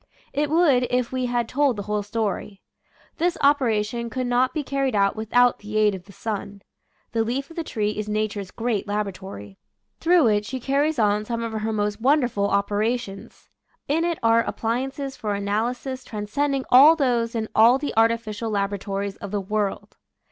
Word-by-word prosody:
It 290 +1 0
would 290 -6 +3
if 250 -1 0
we 255 -1 -1
had 240 -1 0
told 275 0 +1
the 205 - -5
whole 210 +1 -1
story. 205 -1 -3 0.5
This 350 +1 0
operation 235 -5 +1
could 255 +2 -3
not 245 +1 +2
be 305 - -3
carried 275 -3 -1
out 200 -1 +2
with 220 0 -6
out 245 0 +4
the 210 +1 -5
aid 210 -1 +4
of 185 -1 -8
the 200 - -14
sun. 200 -1 -5 0.5
The 225 -1 +1
leaf 270 +6 -3
of - - -12
the 335 - -3
tree 210 -8 -1
is 210 0 -5
nature's 210 -2 -2
great 225 -2 -2
laboratory. 190 - -5 0.4
Through 340 -3 +4
it 205 -1 +2
she 260 +5 -5
carries 280 +4 0
on 210 -2 +2
some 230 +1 -3
of 230 - -3
her 220 0 -2
most 210 0 -2
wonderful 245 -6 +2
opera 205 +4 +1
tions. 195 -5 -11 0.4
In 315 +4 +1
it 340 -1 0
are 230 0 +5
appliances 265 +5 -3
for 210 -3 -3
analysis 235 +6 -2
transcending 265 +6 -2
all 285 +6 +9
those 240 -6 0
in 220 -1 -1
all 230 +4 +6
the 285 +1 -4
artificial 225 -1 +1
laboratories 200 -1 -2
of 200 - -7
the 205 +1 -1
world. 205 0 -3
225 Hz, 180 wpm, -24 LUFS, 210-260 Hz, 0.5 s, all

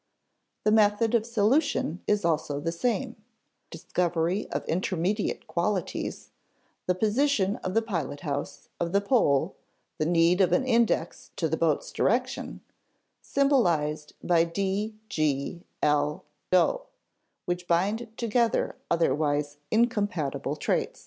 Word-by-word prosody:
The 215 - +3
method 215 +1 +3
of 230 -1 +2
solution 230 - +1
is 205 -3 +1
also 150 -3 0
the 165 +3 -2
same: 240 +7 -1 0.5
discovery 175 +2 -1
of - - -3
intermediate 185 +4 -1
qualities 180 0 -2 0.6
(the 180 - +2
position 215 0 +1
of 185 +2 -5
the 225 - +3
pilot 165 -9 -3
house, 145 -3 -4
of 170 +1 -2
the 200 - +5
pole, 200 - +2 0.5
the 155 - +1
need 170 +2 +4
of 185 - +3
an 260 - +2
index 235 -3 +1
to - - 0
the - - 0
boat's - - 0
direction) - - -1 0.6
symbolized 170 - +1
by 170 -2 +4
d, 195 +5 -2
g, 155 0 -1 0.2
l, 150 0 +1 0.3
o, - - +3 0.6
which 175 0 -3
bind 205 +7 +1
together 235 0 +1
otherwise 145 -2 +1
incompatible 205 - 0
traits. - - -1
185 Hz, 120 wpm, -27 LUFS, 165-220 Hz, 0.6 s, the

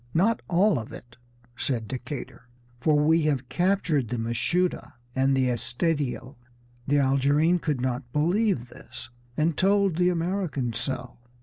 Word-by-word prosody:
"Not 210 +7 +2
all 185 - +3
of 110 - -8
it," 120 0 -12 0.4
said 120 -5 -2
Decatur, 130 0 -7 0.3
"for 150 +4 +3
we 160 +3 +4
have 130 -4 -2
captured 175 - +1
the 120 - -3
Mashuda 125 +13 -1 0.2
and 135 +1 +2
the 130 -1 +2
Estedio." 130 +1 -2 0.5
The 145 +1 +3
Algerine 145 +5 +3
could 150 -6 -2
not 125 -1 -3
believe 170 - +1
this, 120 - -11 0.3
and 155 +1 +1
told 195 -1 +2
the 180 0 +3
American 170 -8 -1
so. 125 0 -4
145 Hz, 135 wpm, -26 LUFS, 125-175 Hz, 0.5 s, we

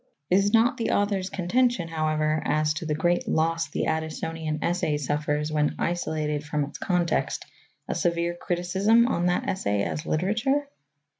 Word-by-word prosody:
Is 200 +2 +4
not 235 +4 +4
the 230 - -1
author's 200 -2 +1
contention, 195 +1 +1
however, 155 -1 0
as 155 0 +1
to 160 +1 -5
the 150 - 0
great 175 +3 +1
loss 165 +1 +1
the - - -2
Addisonian 160 0 -2
essay 170 -4 0
suffers 150 +1 -1
when 150 -1 +1
isolated 155 -4 -1
from 150 0 -1
its 140 - -7
context 175 -3 0 0.4
a - - -1
severe 170 0 0
criticism 190 +7 +2
on 175 -7 +1
that 180 - 0
essay 105 - 0
as 155 +9 -3
literature? 230 - +1
170 Hz, 150 wpm, -26 LUFS, 155-190 Hz, 0.4 s, Is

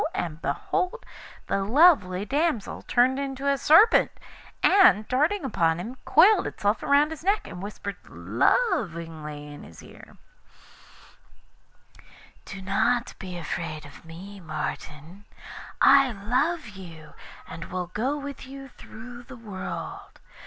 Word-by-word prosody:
and 165 -2 -4
behold 390 +5 -2 0.4
the 195 - -1
lovely 210 - +4
damsel 285 -3 -1
turned 255 +2 +3
into 275 0 -4
a 280 - +3
Serpent, 320 - +5 0.5
and, 365 - +5
darting 300 +7 +1
upon 165 -9 +1
him, 225 +8 -6
coiled 380 +6 +5
itself 205 +2 -1
round 290 +2 +3
his 320 -1 -8
neck, 400 +3 +1
and 175 - -9
whispered 200 0 -6
lovingly 165 - -1
in 145 - -11
his 80 - -13
ear: - - -15 2.3
'Do 190 0 -9
not 235 +5 0
be 185 -3 -7
afraid 160 -2 -5
of 145 - -14
me, 185 +5 -11
Martin; 155 +2 -7 0.5
I 275 -2 +6
love 250 +8 -1
you, 170 -6 -12 0.3
and 165 - -8
will 180 -1 -5
go 260 +7 -1
with 280 -2 -8
you 270 0 -10
through 240 +1 -12
the 265 0 -11
world. 205 -5 -7
220 Hz, 125 wpm, -25 LUFS, 175-280 Hz, 2.3 s, I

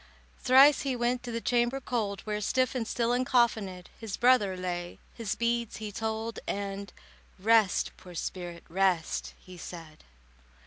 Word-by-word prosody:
Thrice 270 +3 +6
he 270 -2 -1
went 240 +1 0
to 245 - -6
the 230 - -2
chamber 240 +2 +1
cold, 215 -6 -2
Where, 210 -1 -3
stiff 255 +4 +1
and 240 -4 -2
still 235 0 0
uncoffinèd, 235 -7 +1
His 220 -4 -5
brother 235 -6 +4
lay, 175 -1 -4 0.2
his 225 -3 -3
beads 235 -1 -1
he 215 -1 -5
told, 220 +1 -3
And 200 -1 -4 0.5
"Rest, 215 0 +3
poor 180 -1 -12
spirit, 175 0 -5
rest," 180 -2 0
he 180 -1 -13
said. 165 -4 -10
220 Hz, 145 wpm, -29 LUFS, 185-240 Hz, 0.5 s, Thrice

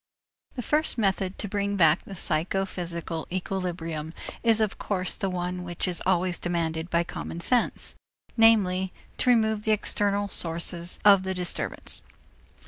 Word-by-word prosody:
The 245 - -4
first 305 0 0
method 195 -3 0
to 210 - -4
bring 200 0 -1
back 165 -3 +4
the 195 - -8
psychophysical 170 -1 -2
equilibrium 175 -4 -3 0.3
is 225 -2 +3
of 215 -2 0
course 185 -3 -2
the 195 - -2
one 180 0 -3
which 175 +1 -1
is 180 -1 +1
also 185 0 +2
demanded 165 -1 -1
by 170 0 +2
common 170 0 -6
sense, 240 +7 +1 0.4
namely, 190 -5 +4 0.3
to - - +2
remove 220 -3 +3
the 215 0 +2
external 205 -1 0
sources 170 -1 0
of 200 -2 +8
the 190 0 -3
disturbance. 180 -1 -1
185 Hz, 140 wpm, -27 LUFS, 170-205 Hz, 0.4 s, of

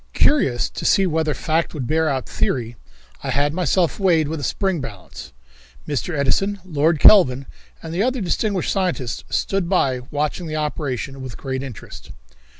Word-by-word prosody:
Curious 135 - +2
to - - -6
see 195 - +4
whether 160 -3 0
fact 165 +1 -1
would 135 -4 -3
bear 160 +3 +1
out 135 -2 -2
theory, 120 -2 -2 0.5
I - - -3
had 145 +1 +1
myself 180 +1 +1
weighed 170 -6 +3
with 160 0 -3
a - - -6
spring 190 -2 -1
balance. 105 -9 -9 0.6
Mr. 150 +3 -2
Edison, 195 +9 +1
Lord 160 -2 +1
Kelvin 140 -11 +6 0.4
and 165 0 -6
the 180 - 0
other 255 +3 +1
distinguished 195 0 -1
scientists 175 - -2
stood 195 -3 -1
by 135 -9 +2
watching 150 +4 -2
the 155 - -4
operation 140 -3 -3
with 130 -3 -7
great 130 -1 -4
interest. 135 -5 -9
155 Hz, 160 wpm, -21 LUFS, 135-180 Hz, 0.6 s, Kelvin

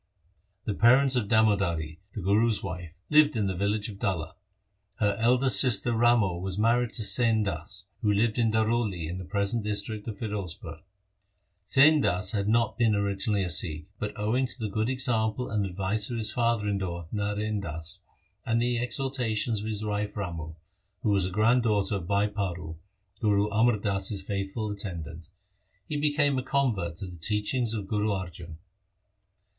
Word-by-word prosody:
The 105 - -1
parents 130 +5 +4
of 120 -5 0
Damodari, 100 -8 +1
the 105 - -5
Guru's 105 +4 +2
wife, 90 -3 -6 0.2
lived 150 -2 +5
in 110 -3 0
the 95 - -1
village 100 +3 -1
of 100 -3 -9
Dalla. 90 -7 -2 0.6
Her 105 -1 +1
eldest 120 -2 +5
sister 120 -1 +3
Ramo 115 -6 +3
was 95 +1 -4
married 115 +2 +2
to 110 - +1
Sain 110 0 +2
Das, 100 -1 -3 0.2
who 105 - +2
lived 110 +3 +1
in 115 -1 +3
Daroli 110 -6 0
in 90 +3 -5
the - - -6
present 100 +3 0
district 105 +1 -3
of 110 - -5
Firozpur. 90 -6 -5 0.9
Sain 145 +7 +5
Das 90 -4 +1
had 100 -2 -1
not 115 0 +1
been 115 -3 +3
origin 100 +1 0
ally 100 - +1
a 90 - -2
Sikh, 80 -2 0
but, 105 - -3
owing 115 +5 0
to - - -5
the 110 -2 -3
good 110 +3 0
example 125 -2 -1
and 105 -2 0
advice 95 +3 -1
of 120 - -3
his 110 -1 0
father 115 -3 0
in 100 -1 0
law 85 -3 -4
Narain 105 0 -2
Das, 85 +2 -3 0.4
and 115 0 0
the 120 0 +1
ex 120 -1 +1
hortations 120 -5 0
of 105 - -5
his 110 -1 -2
wife 105 0 -3
Ramo, 85 -5 -5 0.5
who 110 - +2
was 95 -2 +2
a - - -4
grand 110 +6 +3
daughter 105 -3 +1
of 85 -3 -7
Bhai 100 +1 +2
Paro, 90 -6 -4 0.4
Guru 105 -1 +2
Amar 110 +1 +3
Das's 100 -1 -1
faithful 100 +2 -3
attendant, 85 -5 -6 0.6
he 150 - -4
became 145 -2 +2
a - - -2
convert 115 -12 0
to 95 - -5
the 90 -2 -9
teachings 110 +6 0
of 105 -3 -4
Guru 105 +2 -1
Arjan. 90 -5 -5
105 Hz, 175 wpm, -27 LUFS, 95-115 Hz, 0.9 s, lived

